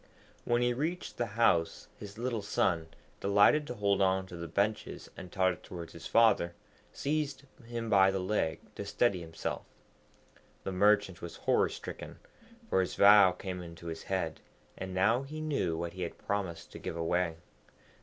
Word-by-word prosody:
When 120 Hz, 0 st, +2 dB
he 120 Hz, 0 st, +2 dB
reached 160 Hz, +8 st, -3 dB
the 120 Hz, -, 0 dB
house 85 Hz, -8 st, +2 dB
his 100 Hz, 0 st, -10 dB
little 120 Hz, -2 st, -2 dB
son, 90 Hz, -5 st, 0 dB, 0.3 s
delighted 100 Hz, +10 st, +4 dB
to 125 Hz, -, -5 dB
hold 100 Hz, -2 st, +1 dB
on 95 Hz, 0 st, +2 dB
to 90 Hz, -, -10 dB
the 85 Hz, 0 st, -6 dB
benches 100 Hz, +6 st, -2 dB
and 90 Hz, -, -9 dB
totter 95 Hz, -2 st, +2 dB
towards 85 Hz, -1 st, -9 dB
his 85 Hz, 0 st, -8 dB
father, 110 Hz, -7 st, +4 dB, 0.4 s
seized 145 Hz, -1 st, -2 dB, 0.2 s
him 115 Hz, 0 st, -5 dB
by 95 Hz, -3 st, +5 dB
the 95 Hz, -, -1 dB
leg 90 Hz, -4 st, -1 dB
to -, -, -5 dB
steady 100 Hz, -1 st, +1 dB
himself. 80 Hz, -1 st, -4 dB, 1.0 s
The 95 Hz, -, -3 dB
Merchant 100 Hz, -1 st, +3 dB
was 85 Hz, -, -7 dB
horror -, -, +2 dB
stricken, -, -, -8 dB, 0.5 s
for 95 Hz, -, +2 dB
his 95 Hz, -, -3 dB
vow 100 Hz, -2 st, +8 dB
came 90 Hz, -2 st, -5 dB
into 85 Hz, -1 st, -10 dB
his 80 Hz, -1 st, -5 dB
head, 90 Hz, -5 st, -2 dB, 0.4 s
and 95 Hz, 0 st, -6 dB
now 110 Hz, +7 st, +3 dB
he 150 Hz, +3 st, -7 dB
knew 140 Hz, -, -1 dB
what 85 Hz, 0 st, -4 dB
he 95 Hz, -, -8 dB
had 85 Hz, -, -4 dB
promised 100 Hz, -5 st, -3 dB
to -, -, -9 dB
give 85 Hz, -, -5 dB
away. 85 Hz, 0 st, 0 dB
95 Hz, 170 wpm, -31 LUFS, 85-115 Hz, 1.0 s, vow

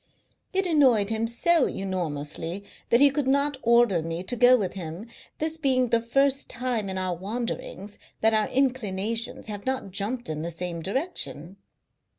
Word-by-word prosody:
It 385 Hz, 0 st, +1 dB
annoyed 255 Hz, -, +4 dB
him 225 Hz, +1 st, 0 dB
so 290 Hz, +6 st, +3 dB
enormously 170 Hz, -1 st, -3 dB, 0.3 s
that 235 Hz, -, +5 dB
he 285 Hz, -1 st, +7 dB
could 285 Hz, -1 st, -1 dB
not 280 Hz, +1 st, +2 dB
order 235 Hz, -7 st, +4 dB
me 165 Hz, +2 st, -4 dB
to 245 Hz, -, -4 dB
go 245 Hz, +1 st, +6 dB
with 195 Hz, -5 st, -2 dB
him, 175 Hz, +2 st, -6 dB, 0.3 s
this 315 Hz, +1 st, -1 dB
being 260 Hz, -5 st, +2 dB
the 230 Hz, 0 st, +2 dB
first 275 Hz, +4 st, +1 dB
time 240 Hz, -4 st, -2 dB
in 190 Hz, -, -3 dB
our 185 Hz, -1 st, -1 dB
wanderings 205 Hz, 0 st, -5 dB, 0.2 s
that 225 Hz, 0 st, +4 dB
our 215 Hz, -1 st, +2 dB
inclinations 230 Hz, -3 st, -1 dB
have 205 Hz, +1 st, -7 dB
not 260 Hz, -7 st, -2 dB
jumped 225 Hz, +6 st, -2 dB
in 155 Hz, -1 st, -3 dB
the 170 Hz, -, -3 dB
same 170 Hz, 0 st, -4 dB
direction. 195 Hz, -, -3 dB
225 Hz, 165 wpm, -26 LUFS, 190-260 Hz, 0.3 s, he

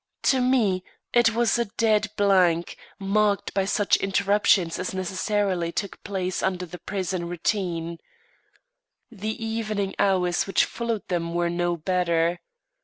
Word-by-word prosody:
To 260 Hz, -2 st, +3 dB
me 225 Hz, -8 st, +2 dB, 0.3 s
it 240 Hz, -2 st, +4 dB
was 235 Hz, 0 st, +2 dB
a 235 Hz, -, +1 dB
dead 215 Hz, 0 st, +1 dB
blank, 185 Hz, -4 st, +3 dB, 0.2 s
marked 205 Hz, 0 st, +1 dB
by 195 Hz, -1 st, +1 dB
such 205 Hz, +1 st, +2 dB
interruptions 195 Hz, -3 st, +2 dB
as 185 Hz, +1 st, -3 dB
necessarily 185 Hz, -1 st, -1 dB
took 200 Hz, +2 st, -5 dB
place 185 Hz, -2 st, -2 dB
under 185 Hz, -1 st, -1 dB
the 175 Hz, +1 st, -10 dB
prison 185 Hz, -3 st, -3 dB
routine. 170 Hz, -2 st, -2 dB, 1.1 s
The 220 Hz, +1 st, -4 dB
evening 215 Hz, -3 st, -2 dB
hours 180 Hz, -3 st, +2 dB
which 195 Hz, -, +3 dB
followed 230 Hz, -3 st, -4 dB
them 170 Hz, -2 st, -2 dB
were 175 Hz, 0 st, +1 dB
no 175 Hz, 0 st, 0 dB
better. 170 Hz, 0 st, +1 dB
195 Hz, 130 wpm, -25 LUFS, 175-210 Hz, 1.1 s, it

